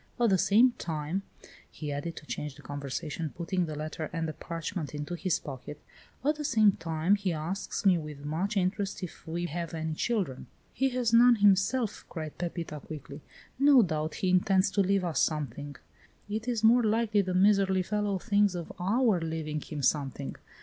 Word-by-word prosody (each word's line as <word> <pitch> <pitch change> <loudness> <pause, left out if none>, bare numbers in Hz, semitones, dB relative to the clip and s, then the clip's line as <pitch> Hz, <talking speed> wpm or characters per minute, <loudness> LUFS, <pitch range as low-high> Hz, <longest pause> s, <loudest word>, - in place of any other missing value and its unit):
At 235 -3 +4
the 190 - +5
same 230 +8 +5
time," 160 +3 -2 0.5
he 150 -2 -6
added, 145 +4 -4
to - - -10
change 150 -2 -5
the - - -15
conversation, 145 +2 -4
putting 175 0 -1
the 155 - -5
letter 155 +1 -4
and 165 -2 -2
the 155 - -4
parchment 165 -1 -5
into 150 +4 -4
his 175 -1 0
pocket, 140 +1 -8 0.5
"at 300 +1 +2
the 300 - -4
same 220 -7 +5
time, 165 +1 0
he 200 -3 -1
asks 170 +7 -3
me 185 -3 +5
with 150 -2 -8
much 185 +8 -1
interest 195 +1 -1
if 175 - -8
we 170 +2 -2
have 170 0 -4
any 160 0 -2
children." 185 - -2 0.3
"He 270 0 +1
has 245 -2 0
none 240 +1 +7
himself," 205 +2 +2
cried 155 -3 -6
Pepita 170 -3 -4
quickly. 150 -1 -9 0.4
"No 275 -3 +7
doubt 155 -3 -2
he 185 -4 0
intends 190 +1 +3
to 200 - +2
leave 195 -1 +2
us 165 -3 -1
something." 145 -2 -1 0.5
"It 215 +3 -4
is 235 -3 -1
more 235 +3 +6
likely 220 -1 +2
the 185 -1 -2
miserly 190 -1 +4
fellow 205 +1 -1
thinks 205 -1 +2
of 170 -2 -5
our 210 +2 +2
leaving 160 -2 -3
him 150 -3 -6
something. 140 -1 0
180 Hz, 180 wpm, -29 LUFS, 155-205 Hz, 0.5 s, none